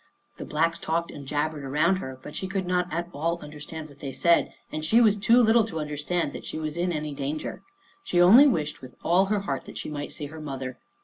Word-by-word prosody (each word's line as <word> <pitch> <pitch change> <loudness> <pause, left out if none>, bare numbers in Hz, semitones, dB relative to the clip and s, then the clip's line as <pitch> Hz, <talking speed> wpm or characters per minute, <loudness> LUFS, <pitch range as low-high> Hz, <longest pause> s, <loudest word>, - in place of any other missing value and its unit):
The - - -6
Blacks 165 +2 0
talked 170 +1 -1
and 140 -2 -9
jabbered 150 +1 -1
around 155 +7 +2
her, 130 -7 -6
but - - -9
she 190 - -3
could 195 -1 -2
not 180 0 0
at 170 +1 -2
all 165 +4 -1
understand 150 0 -8
what 145 -1 -17
they 140 - -5
said, 170 +5 +3 0.2
and 155 - -4
she 220 +9 +4
was 220 -4 +5
too 230 +4 +4
little 230 -1 +5
to 165 -7 -5
understand 150 +2 -2
that - - -7
she - - -6
was 155 -1 -3
in 175 +1 0
any 150 -2 -3
danger. 140 +2 -4 0.4
She 175 - 0
only 220 +12 +9
wished 150 - -1
with 130 -1 -11
all 180 +3 +4
her 205 0 0
heart 140 -9 -3
that - - -9
she - - -5
might 145 -1 -5
see 150 - -5
her 155 +2 -9
mother. 135 -3 -5
160 Hz, 235 wpm, -26 LUFS, 145-180 Hz, 0.4 s, only